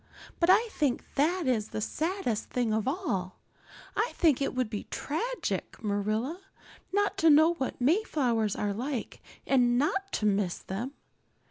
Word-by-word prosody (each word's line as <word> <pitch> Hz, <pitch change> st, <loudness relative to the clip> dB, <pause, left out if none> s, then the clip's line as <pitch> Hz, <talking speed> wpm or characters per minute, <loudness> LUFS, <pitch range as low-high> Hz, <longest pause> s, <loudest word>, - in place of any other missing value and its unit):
But 340 Hz, -, +3 dB
I 445 Hz, +5 st, +6 dB
think 285 Hz, -9 st, -1 dB
that 335 Hz, +5 st, +1 dB
is 225 Hz, -5 st, +1 dB
the -, -, -4 dB
saddest 310 Hz, -, -2 dB
thing 240 Hz, -3 st, 0 dB
of 220 Hz, +1 st, 0 dB
all. 260 Hz, -, -2 dB, 0.6 s
I 445 Hz, +3 st, 0 dB
think 305 Hz, -7 st, +3 dB
it 275 Hz, -, -1 dB
would 255 Hz, -2 st, +1 dB
be 210 Hz, -1 st, -5 dB
tragic, 470 Hz, -, -3 dB
Marilla, 215 Hz, -, -1 dB, 0.5 s
not 410 Hz, +1 st, +1 dB
to 325 Hz, -, +5 dB
know 315 Hz, +3 st, +6 dB
what 270 Hz, -6 st, -4 dB
Mayflowers 250 Hz, -, +1 dB
are 205 Hz, -1 st, -1 dB
like 250 Hz, +3 st, -4 dB, 0.2 s
and 245 Hz, -2 st, +3 dB
not 390 Hz, +8 st, 0 dB
to 215 Hz, -, 0 dB
miss 195 Hz, -4 st, +1 dB
them. 230 Hz, +9 st, -5 dB
265 Hz, 150 wpm, -29 LUFS, 215-335 Hz, 0.6 s, I